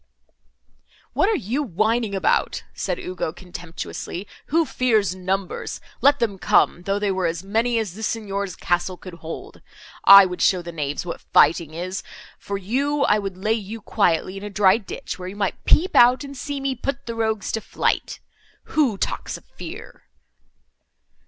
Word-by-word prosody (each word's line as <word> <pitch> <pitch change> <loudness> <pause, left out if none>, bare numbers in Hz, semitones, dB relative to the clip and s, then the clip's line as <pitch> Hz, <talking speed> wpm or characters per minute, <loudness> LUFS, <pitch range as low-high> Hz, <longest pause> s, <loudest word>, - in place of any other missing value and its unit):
"What 390 - +3
are 445 - +2
you 245 - -2
whining 220 - 0
about?" 190 - +1
said - - -2
Ugo, 180 -3 -3
contemptuously, 175 +2 -7 0.2
"who 330 +2 +2
fears 225 - +1
numbers! 185 0 -3 0.2
Let 285 +1 +5
them 215 -6 -1
come, 175 - +3
though 195 +2 -1
they 205 -1 0
were 185 -2 0
as 165 +1 -3
many 225 +4 +1
as 215 -6 -2
the 215 - -9
Signor's 200 -4 -2
castle 175 +1 -1
could 185 0 -10
hold; 165 -1 -8 0.4
I 200 0 +10
would 180 -1 -4
show 180 -2 +3
the 170 - -6
knaves 150 -1 -3
what 170 - -5
fighting 160 -2 +3
is. 185 +3 -4 0.4
For 200 - -4
you—I 260 +3 +1
would 195 -2 -5
lay 215 +4 +1
you 220 0 -4
quietly 190 -3 +1
in 195 - -8
a 210 - -5
dry 195 0 +4
ditch, 205 -3 -7
where 180 - -6
you 190 - -7
might 200 -2 -2
peep 360 +4 +3
out, 250 +3 +6
and 280 0 -8
see 285 +1 -4
me 270 0 -1
put 275 +2 -4
the 230 - -4
rogues 220 -2 -1
to 225 - -2
flight.—Who 255 +3 -2
talks - - -3
of - - -18
fear!" - - -9
200 Hz, 165 wpm, -23 LUFS, 185-230 Hz, 0.4 s, I